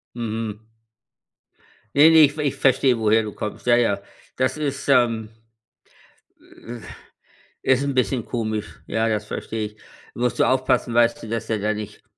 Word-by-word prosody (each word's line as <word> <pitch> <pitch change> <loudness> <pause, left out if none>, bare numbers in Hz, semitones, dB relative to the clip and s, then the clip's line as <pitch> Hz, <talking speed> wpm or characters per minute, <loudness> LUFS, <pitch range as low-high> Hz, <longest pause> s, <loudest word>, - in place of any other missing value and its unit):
Mhm. 110 -2 -5 1.3
Ne, 150 +3 +8
ne, 160 - +6
ich 145 - +2
v - - -4
ich 140 - -1
verstehe, 130 -2 +3
woher 110 0 +3
du 105 -1 -6
kommst. 105 +3 -6
Ja, 120 -1 +5
ja. 110 -5 +1 0.4
Das 130 +1 0
ist, 145 -3 -4
ähm, 115 -5 +2 1.4
äh, 120 0 -7 0.8
ist 130 +1 +2
'n 140 0 -1
bisschen 130 -2 0
komisch, 110 -3 -4
ja, 110 0 0
das 105 -1 -1
verstehe 110 +1 -4
ich. 105 0 -17 0.4
Musst 120 0 -1
du - - +5
aufpassen, 130 -2 +1
weißt 120 0 +2
du, - - -7
dass 115 0 -4
er 110 - 0
da 105 +2 0
nicht 105 -1 -8
115 Hz, 165 wpm, -22 LUFS, 110-130 Hz, 1.4 s, Ne